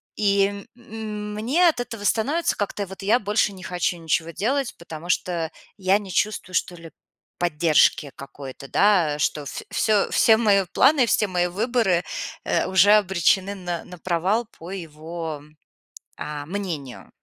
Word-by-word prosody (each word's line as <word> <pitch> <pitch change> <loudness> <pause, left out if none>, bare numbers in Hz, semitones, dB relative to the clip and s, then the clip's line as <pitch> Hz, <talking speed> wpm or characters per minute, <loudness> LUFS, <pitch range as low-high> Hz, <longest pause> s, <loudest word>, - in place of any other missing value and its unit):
И, 200 -1 +1
м, 215 -3 -6
мне 265 +12 +2
от 300 -7 +2
этого 230 -4 -7
становится, 280 - +1
как-то 205 0 -3
вот, 190 +1 -10
я 220 +5 +3
больше 210 -1 +1
не 185 -1 -11
хочу 180 -1 -1
ничего 165 0 -1
делать, 255 - -1
потому 170 0 -9
что 170 -3 -1 0.3
я 190 0 +3
не 200 -2 -8
чувствую, 205 -2 -1
что 180 - 0
ли, 165 -1 -12 0.5
поддержки 155 -3 +2
какой-то, 140 -1 -10
да. 175 -8 +3
Что 150 -1 -1
в - - -6
всё, 215 -2 +2
все 220 -1 +5
мои 205 -4 +3
планы, 270 -1 +5
все 215 -2 +2
мои 180 -2 0
выборы, 205 -2 +1 0.4
э, - - +1
уже 190 +2 +5
обречены 190 -1 +2
на 175 -3 -4
на 180 0 -11
провал 185 +7 0
по 170 +3 -9
его, 160 -3 -6 0.8
а, 145 -1 -5
мнению. 165 -8 -5
190 Hz, 150 wpm, -23 LUFS, 170-210 Hz, 0.8 s, все